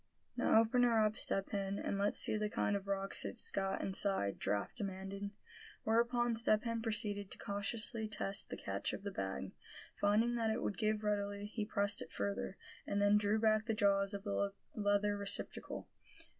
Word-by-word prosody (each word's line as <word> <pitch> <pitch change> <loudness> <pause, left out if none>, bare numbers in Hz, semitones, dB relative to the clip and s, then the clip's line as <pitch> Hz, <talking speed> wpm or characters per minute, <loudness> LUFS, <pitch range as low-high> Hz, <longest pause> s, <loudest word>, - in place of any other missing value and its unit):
"Now, - - +4
open 225 +2 +3
her 240 -2 +4
up, 215 0 0
Step 195 -2 +2
Hen, 195 -1 -2
and 200 - -2
let's 205 +1 +1
see - - +3
the 210 0 -1
kind 205 -1 0
of 200 0 -4
rocks 195 0 +1
it's - - -1
got 195 -1 -1
inside," 190 - +1
Giraffe 100 0 -1
demanded. 195 -1 -4 0.5
Whereupon 235 +1 +2
Step 215 -1 +4
Hen 230 -1 -2
proceeded 210 -3 0
to - - -6
cautiously 215 +2 0
test 200 -2 -2
the - - -5
catch 95 0 -3
of - - -6
the 200 - -4
bag. 95 - -4 0.4
Finding 215 +4 +2
that 225 -1 +1
it 220 - -1
would 200 - -2
give 215 -1 0
readily, 205 -1 -1
he 215 0 -3
pressed 205 -1 +1
it - - -8
further, 200 -1 -3 0.3
and 200 - 0
then 205 +1 +5
drew 210 +1 +1
back 215 0 +2
the 225 - 0
jaws 200 -1 +2
of 200 - -6
the 200 -1 -1 0.2
leather 205 0 +1
receptacle. 200 0 -2
205 Hz, 185 wpm, -36 LUFS, 200-220 Hz, 0.5 s, then